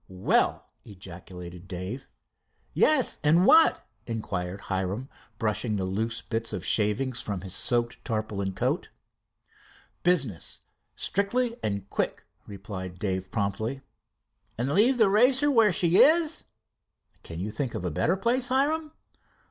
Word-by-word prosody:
"Well!" 95 0 +1 0.2
ejaculated 90 -2 -10
Dave. 95 +9 -6 0.6
"Yes, 300 -6 +3
and 165 +5 +4
what?" 320 +6 +5 0.2
inquired 100 -5 -4
Hiram, 95 +7 -3 0.3
brushing 110 -1 -1
the 95 - -2
loose 110 +5 -2
bits 115 0 -3
of - - -4
shavings 115 +4 0
from 100 -4 -4
his 95 -1 -5
soaked 120 +1 0
tarpaulin 110 -4 -3
coat. - - -1 1.1
"Business 140 - 0 0.3
strictly 230 +5 0
and 100 -1 -3
quick," - - -2 0.2
replied 95 -2 -7
Dave 95 -1 -3
promptly. 110 +7 -2 0.8
"And 130 +5 -1
leave 240 +8 +4
the 220 -3 +5
Racer 255 +8 +4
where 225 -6 +5
she 175 +1 +3
is?" 320 0 +4 0.8
"Can 85 0 -8
you 100 +4 -3
find 120 +2 -3
a 90 -1 -3
better 185 - +1
place, 240 +5 +1
Hiram?" 300 +4 0
115 Hz, 125 wpm, -27 LUFS, -, 1.1 s, what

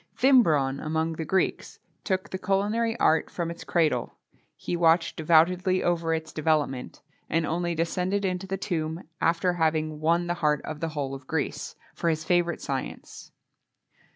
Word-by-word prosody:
Thimbron, 160 - +4
among 160 +1 -1
the 160 0 -5
Greeks, 190 +4 -1 0.3
took 190 -1 -1
the 185 - -4
culinary 215 +5 0
art 160 - +3
from 170 -1 -3
its 170 - -9
cradle: 155 -8 0 0.4
he - - -4
watched 165 0 +3
devoutedly 175 +4 +3
over 170 -2 0
its 160 -1 -3
development, 150 -5 -1 0.3
and 165 +1 +1
only 170 +2 -1
descended 180 +4 -1
into 185 0 -2
the 195 0 -2
tomb 165 -3 -3 0.2
after 170 +2 +2
having 155 -2 0
won 170 +3 +2
the 175 - -1
heart 150 -2 +2
of 155 -1 -6
the 165 0 -2
whole 135 -2 -2
of 135 -1 -9
Greece,[XXII 145 -1 -3
11] - - -29
for 170 - +1
his 160 -1 -1
favourite 175 0 +1
science. 135 -1 -6
165 Hz, 160 wpm, -26 LUFS, 155-180 Hz, 0.4 s, Thimbron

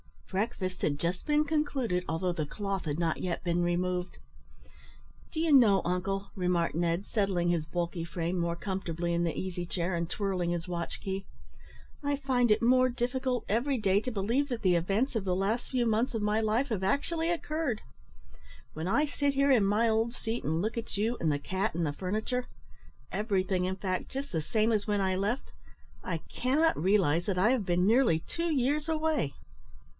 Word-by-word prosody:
Breakfast 190 -2 -2
had 145 -2 +1
just 170 +4 -2
been 300 0 +4
concluded, 280 - 0
although 170 +3 0
the 160 -3 -2
cloth 195 +3 -3
had 145 -1 -2
not 165 -2 0
yet 180 -2 -3
been 175 0 +1
removed. 180 +1 -1 1.2
"Do 315 - -1
you 325 -1 +2
know, 225 -9 +6
uncle," 195 +3 -2
remarked 180 -3 +1
Ned, 170 +3 0
settling 195 -5 0
his 170 -3 +1
bulky 170 +1 -3
frame 170 +1 -2
more 170 0 0
comfortably 170 -2 -3
in 170 0 +1
the 165 - -2
easy 180 -1 -3
chair, 175 +1 -2
and 170 -1 -1
twirling 185 -4 -1
his 175 0 -3
watch 170 -1 -4
key, 195 0 -3 0.8
"I 285 -1 0
find 260 -4 +1
it 215 +2 +3
more 255 +2 +5
difficult 250 0 -1
every 255 +6 +1
day 200 -3 +3
to 255 - -3
believe 230 +6 0
that 240 -3 -3
the 185 -4 +4
events 205 +10 0
of 200 - -3
the 180 -1 +1
last 205 +6 -1
few 250 -2 +1
months 225 +2 +1
of 225 - -1
my 210 +1 +2
life 225 +5 +1
have 215 -5 -1
actually 320 - 0
occurred. 310 -8 -1 0.9
When 160 +3 -4
I 290 +11 +3
sit 285 -1 0
here 275 +1 +3
in 230 -6 +5
my 215 +4 +3
old 225 +1 +1
seat, 230 -1 -4
and 160 +2 0
look 220 +4 -2
at 230 -3 -4
you 225 +4 0
and 160 - +1
the 145 - 0
cat 190 +5 -2
and 170 -1 0
the 145 - -1
furniture 215 +9 -2 0.6
everything, 190 -3 0
in 185 +1 -1
fact, 185 -1 -3
just 275 +1 -5
the 160 - 0
same 220 +7 +1
as 210 -1 0
when 205 -1 +1
I 190 -1 +1
left 205 +7 -2 0.5
I 170 -3 -2
cannot 290 - +1
realise 175 -3 +3
that 195 -3 -1
I 205 +6 +4
have 250 -6 +1
been 180 0 +2
nearly 225 -6 +4
two 335 - -3
years 290 +2 +1
away." 310 - 0
200 Hz, 190 wpm, -30 LUFS, 175-245 Hz, 1.2 s, know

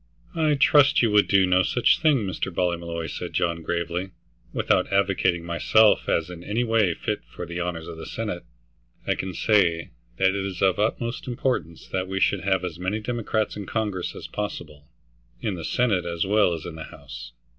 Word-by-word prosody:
"I 155 -3 +2
trust 145 -1 +5
you 115 - +3
would 105 0 +4
do 95 -1 +4
no 90 0 +4
such 120 +5 +3
thing, 140 -9 +3
Mr. 95 0 -3
Ballymolloy," 85 -2 -2
said 80 - -6
John 85 -1 0
gravely. 85 +3 -2 0.4
"Without - - +1
advocating 95 -3 +1
myself 105 +6 +3
as 80 - +1
in 85 -1 -9
any 110 +6 -1
way 110 -7 +2
fit - - -3
for 90 - -7
the 85 +1 -5
honors 85 -2 -3
of 85 -1 -8
the 80 - -8
Senate, 105 -6 -4 0.6
I - - +2
can 95 -1 -5
say 90 -7 +2 0.3
that 95 - +4
it 100 0 -1
is 95 -2 -5
of 95 -2 +3
the - - 0
utmost 115 +3 -2
importance 120 - -2
that 95 0 -2
we 95 0 -2
should 100 0 +2
have 95 -1 +1
as 85 -1 -6
many 95 +4 -1
Democrats 110 -2 -2
in 100 -3 -6
Congress 105 -5 -2
as - - -8
possible, 75 -8 -6 0.5
in 100 - -2
the 85 -3 -6
Senate 100 -7 +1
as 85 0 -1
well 100 -2 +3
as 80 -1 -6
in 85 - -6
the 80 0 -7
House." - - -10
95 Hz, 195 wpm, -25 LUFS, 85-105 Hz, 0.6 s, trust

